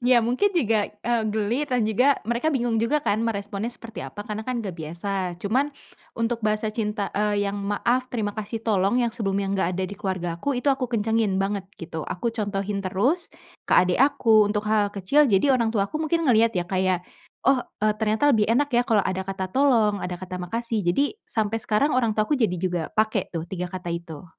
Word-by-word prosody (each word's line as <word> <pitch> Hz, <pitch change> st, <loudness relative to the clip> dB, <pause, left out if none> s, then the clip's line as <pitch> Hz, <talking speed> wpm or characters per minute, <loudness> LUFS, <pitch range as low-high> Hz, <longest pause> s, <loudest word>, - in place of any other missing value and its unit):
Ya 250 Hz, -1 st, +6 dB
mungkin 255 Hz, -, +2 dB
juga, 220 Hz, -8 st, +2 dB
eee, 230 Hz, +2 st, -1 dB
geli 220 Hz, +5 st, 0 dB
dan 250 Hz, -3 st, +1 dB
juga 250 Hz, +6 st, +3 dB
mereka 240 Hz, +6 st, 0 dB
bingung 240 Hz, -5 st, 0 dB
juga 230 Hz, +7 st, +2 dB
kan 210 Hz, +2 st, +1 dB
meresponnya 205 Hz, -1 st, -2 dB
seperti 230 Hz, -1 st, -9 dB
apa, 205 Hz, -, -7 dB
karena 215 Hz, -1 st, -4 dB
kan 255 Hz, -1 st, -1 dB
gak 190 Hz, -, -4 dB
biasa 175 Hz, +3 st, -4 dB
cuman 255 Hz, +10 st, 0 dB, 0.5 s
untuk 230 Hz, 0 st, 0 dB
bahasa 215 Hz, +1 st, 0 dB
cinta, 210 Hz, -2 st, -2 dB
eee, 205 Hz, 0 st, +1 dB
yang, 200 Hz, +1 st, -3 dB
"maaf, 240 Hz, +5 st, 0 dB
terima 215 Hz, -4 st, -2 dB
kasih, 215 Hz, +1 st, -4 dB
tolong", 200 Hz, +1 st, +2 dB
yang 240 Hz, -2 st, +1 dB
sebelumnya 195 Hz, -3 st, -1 dB
nggak 195 Hz, -, +1 dB
ada 190 Hz, -, 0 dB
di 200 Hz, -, -7 dB
keluarga 185 Hz, -4 st, -3 dB
aku, 285 Hz, -, 0 dB
itu 265 Hz, -, 0 dB
aku 265 Hz, -1 st, -2 dB
kencengin 220 Hz, -3 st, +1 dB
banget 195 Hz, 0 st, -1 dB
gitu. 160 Hz, -1 st, -6 dB
Aku 210 Hz, +7 st, -2 dB
contohin 200 Hz, -2 st, -2 dB
terus 220 Hz, -, 0 dB, 0.4 s
ke -, -, +1 dB
adik 180 Hz, 0 st, +4 dB
aku 230 Hz, -7 st, +4 dB
untuk 210 Hz, 0 st, -1 dB
hal 210 Hz, -1 st, +2 dB
kecil, 210 Hz, +10 st, +3 dB
jadi 205 Hz, +8 st, +4 dB
orang 235 Hz, -3 st, +2 dB
tuaku 200 Hz, +4 st, 0 dB
mungkin 330 Hz, +1 st, 0 dB
ngelihat 230 Hz, -2 st, +4 dB
ya 175 Hz, -, -1 dB
kayak, 185 Hz, -1 st, 0 dB, 0.4 s
oh, 265 Hz, -2 st, +4 dB, 0.2 s
eee, 215 Hz, 0 st, +3 dB
ternyata 220 Hz, +6 st, +2 dB
lebih 215 Hz, -4 st, +3 dB
enak 280 Hz, +5 st, +3 dB
ya 240 Hz, 0 st, +4 dB
kalau 220 Hz, -5 st, +3 dB
ada 190 Hz, 0 st, -1 dB
kata 190 Hz, -1 st, -3 dB
tolong, 230 Hz, -6 st, +3 dB
ada 180 Hz, 0 st, -3 dB
kata 185 Hz, 0 st, -6 dB
makasih. 230 Hz, +4 st, -2 dB
Jadi 195 Hz, -, +1 dB
sampai 220 Hz, 0 st, -1 dB
sekarang 240 Hz, +6 st, +2 dB
orang 230 Hz, -4 st, +2 dB
tuaku 215 Hz, +7 st, +2 dB
jadi 225 Hz, -9 st, +1 dB
juga 180 Hz, -1 st, -1 dB
pake 215 Hz, -3 st, 0 dB
tuh 165 Hz, -1 st, -4 dB
3 180 Hz, 0 st, -4 dB
kata 185 Hz, -2 st, -6 dB
itu. 170 Hz, -3 st, -7 dB
215 Hz, 200 wpm, -24 LUFS, 195-240 Hz, 0.5 s, Ya